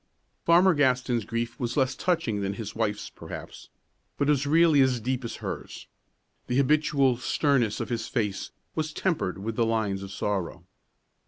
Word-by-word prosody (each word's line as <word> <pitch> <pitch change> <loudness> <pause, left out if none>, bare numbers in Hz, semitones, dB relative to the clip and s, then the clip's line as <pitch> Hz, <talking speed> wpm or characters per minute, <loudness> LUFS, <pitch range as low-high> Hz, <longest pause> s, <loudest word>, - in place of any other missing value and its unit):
Farmer 175 +2 +6
Gaston's 125 -5 +1
grief 115 +1 -3
was 120 +1 -2
less 130 -1 +2
touching 125 - 0
than 100 0 -2
his 105 -1 -6
wife's 105 -2 -1
perhaps, - - -9 0.5
but 140 - +1
it - - +5
was 140 -1 +1
really 160 -1 +5
as 130 -2 +3
deep 125 +3 -2
as 115 - -5
hers. - - -6 0.6
The 125 - 0
habitual 140 -2 +3
sternness 125 -4 +1
of - - -3
his 115 -2 -2
face 105 -5 -2 0.2
was 155 -1 -2
tempered 160 - -1
with 110 +3 -4
the 120 - +3
lines 105 -4 0
of 100 0 -7
sorrow. 95 -3 -3
125 Hz, 165 wpm, -27 LUFS, 110-145 Hz, 0.6 s, Farmer